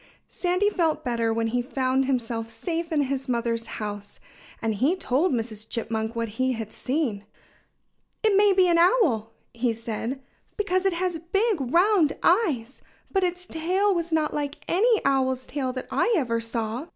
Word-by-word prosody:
Sandy 365 +3 +1
felt 320 -5 0
better 230 -2 0
when 225 0 0
he 245 +2 0
found 260 +1 0
himself 230 -3 -2
safe 335 - -4
in 300 -2 +2
his 270 -1 -3
mother's 230 -1 -1
house. 205 -2 -6 0.4
And 225 -1 -1
he 270 - +2
told 325 0 +1
Mrs. 225 -3 -3
Chipmunk 220 -1 -2
what 230 0 -1
he 260 0 +2
had 220 -2 -6
seen. 255 -8 -2 1.0
"It 430 -2 +4
may 410 0 +6
be 375 -1 +4
an 340 -1 +4
owl," 320 - +3 0.2
he 235 0 0
said, 230 +3 -4 0.4
"because 390 -2 +1
it 385 - +1
has 350 -1 -1
big, 390 +2 0
round 355 -3 +4
eyes. 305 - +2 0.3
But 385 -1 +1
its 360 0 -1
tail 370 +5 +1
was 340 -1 -2
not 310 -1 +1
like 290 -1 -4
any 440 +5 +2
owl's 260 -2 +1
tail 265 -2 -2
that 255 - -5
I 480 - +2
ever 235 -6 0
saw. 230 +4 -3
275 Hz, 165 wpm, -25 LUFS, 230-355 Hz, 1.0 s, may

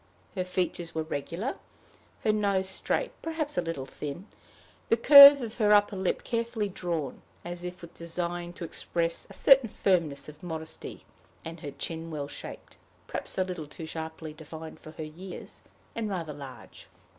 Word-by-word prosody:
Her 185 - -1
features 180 -2 -2
were 160 - 0
regular 165 - -3 0.7
her 215 - +4
nose 200 -3 +1
straight 335 - -1
perhaps 320 -2 -3
a 180 - +2
little 165 -6 -4
thin; 150 +6 -6 0.6
the 230 - +5
curve 280 +3 +11
of 230 +1 -7
her 210 -1 +5
upper 205 0 +4
lip 190 -1 -1
carefully 230 -3 -1
drawn, 170 -7 -3 0.2
as 175 0 -6
if 180 0 -7
with 170 - -10
design 175 +1 -3
to 175 - -8
express 165 0 -2
a - - -11
certain 270 -4 +6
firmness 165 -9 +1
of 150 0 -12
modesty; 160 -2 -7 0.4
and 165 +1 -7
her 145 - -6
chin 165 +3 -5
well 145 -3 -4
shaped, - - -9 0.3
perhaps - - -5
a 190 - +3
little 180 -5 -5
too 160 +2 -8
sharply 160 -1 -6
defined 160 +1 -9
for - - -11
her 155 - -6
years, 170 +5 -8 0.3
and 225 -2 -2
rather 170 -6 -3
large. 135 -5 -11
175 Hz, 165 wpm, -29 LUFS, 160-200 Hz, 0.7 s, curve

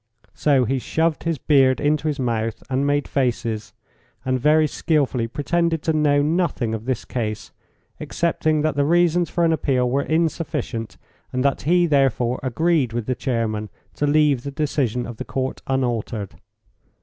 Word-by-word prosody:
So 140 -4 +2
he 130 +3 0
shoved 160 +5 -1
his 165 -2 0
beard 135 -2 +3
into 150 +1 +1
his 150 -2 -2
mouth 115 -2 -2
and 135 +2 +1
made 145 0 +1
faces, 115 -5 -1 0.5
and 130 0 0
very 155 +4 +4
skilfully 140 -6 0
pretended 165 +5 -1
to 160 - +1
know 145 -2 +3
nothing 150 -8 0
of 110 0 -5
this 130 -3 -2
case, 110 -4 -4 0.5
excepting 155 -2 0
that 155 0 0
the 145 - +2
reasons 175 +2 +2
for 170 -1 +1
an 165 - +3
appeal 130 -5 +1
were 135 +3 +1
insufficient, 155 -8 -2 0.3
and 130 +1 -1
that 140 - +1
he, 175 0 +4
therefore, 135 -5 +1
agreed 135 -1 +1
with 120 -2 -2
the 130 - 0
chairman 115 -5 -2 0.2
to 145 - -1
leave 145 -3 +3
the 140 - -5
decision 140 -5 -1
of 120 -2 -8
the - - -4
Court 130 0 -3
unaltered. 120 -6 -2
140 Hz, 160 wpm, -22 LUFS, 120-155 Hz, 0.5 s, very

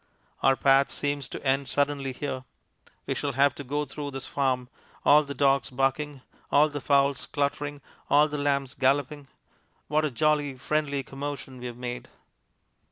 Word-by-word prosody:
Our 135 - +5
path 135 +1 +4
seems 145 -3 -2
to - - -8
end 135 0 +2
suddenly 140 -1 0
here. 130 0 -4 0.6
We - - -1
shall 140 -1 -2
have 140 +1 +4
to 145 - -8
go 145 +3 -2
through 145 +1 -6
this 135 -1 -6
farm. 130 -3 0 0.4
All 150 +1 +7
the 140 -1 -6
dogs 135 +1 +3
barking, 135 +1 -1 0.3
all 150 +2 +5
the 145 -1 -5
fowls 140 -1 +2
cluttering, 145 0 -2 0.3
all 145 +2 +6
the 150 -1 -4
lambs 140 -2 0
galloping 140 +1 0 0.6
what 155 +1 +2
a 155 - +1
jolly, 145 0 +1
friendly 145 +1 -1
commotion 135 -1 -6
we've 120 -1 -6
made! 125 0 -5
140 Hz, 160 wpm, -27 LUFS, 135-145 Hz, 0.6 s, All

